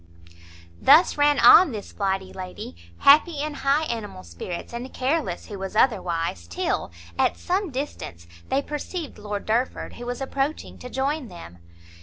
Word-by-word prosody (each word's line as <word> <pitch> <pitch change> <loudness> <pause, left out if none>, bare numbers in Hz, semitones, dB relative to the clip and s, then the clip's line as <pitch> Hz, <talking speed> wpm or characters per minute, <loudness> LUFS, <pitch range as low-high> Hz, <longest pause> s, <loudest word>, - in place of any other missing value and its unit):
Thus 310 +6 +6
ran 290 0 +3
on 340 -3 +8
this 210 -2 -7
flighty 195 -2 -2
lady, 180 - -8 0.2
happy 300 +2 +5
in 300 +1 -2
high 285 +2 +1
animal 225 - -5
spirits, 85 - -7
and 245 +2 -6
careless 265 - -1
who 205 -2 -8
was 195 +2 -6
otherwise, 170 - 0
till, 85 +1 -2 0.3
at - - +2
some 375 +1 -1
distance, 255 - -6 0.2
they 275 +1 +1
perceived 300 - -6
Lord 205 -1 -5
Derford, 235 +4 -1
who 240 - -8
was 245 0 -3
approaching 275 +2 -3
to 250 - -8
join 270 +2 -2
them. 90 - -12
245 Hz, 150 wpm, -24 LUFS, 190-290 Hz, 0.3 s, on